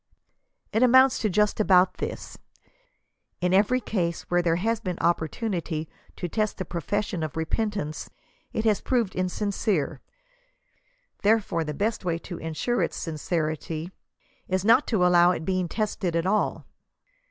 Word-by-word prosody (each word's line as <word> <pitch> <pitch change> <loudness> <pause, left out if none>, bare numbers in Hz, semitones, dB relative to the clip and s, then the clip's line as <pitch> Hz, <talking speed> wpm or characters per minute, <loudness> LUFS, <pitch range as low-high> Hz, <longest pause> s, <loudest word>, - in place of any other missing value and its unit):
It 220 - +2
amounts 260 +1 +6
to 215 - 0
just 210 +3 +1
about 185 -3 +4
this: - - -6 1.0
In 180 0 +1
every 210 +6 +4
case 180 -7 -2
where 175 0 +4
there 170 -1 +2
has 225 +5 0
been 185 -6 -4
opportunity 170 -1 -1 0.3
to 175 - -4
test 215 +4 -1
the 185 - -4
profession 180 +2 -2
of 155 -1 -4
repentance, 165 -1 -2 0.4
it 220 - -2
has 215 -2 +3
proved 235 -7 0
insincere, 190 -1 -1 1.2
therefore 200 -6 +2
the 150 -2 -5
best 215 +4 -1
way 170 -2 0
to 170 0 -8
ensure 165 +10 -1
its - - -1
smcerity 160 +1 -3 0.6
is 185 +1 -1
not 230 +6 +5
to 195 -6 +2
allow 175 0 +6
its 170 -3 -1
being 185 -1 0
tested 195 -3 -2
at 165 0 +1
ail. 210 +3 0
185 Hz, 140 wpm, -26 LUFS, 170-215 Hz, 1.2 s, amounts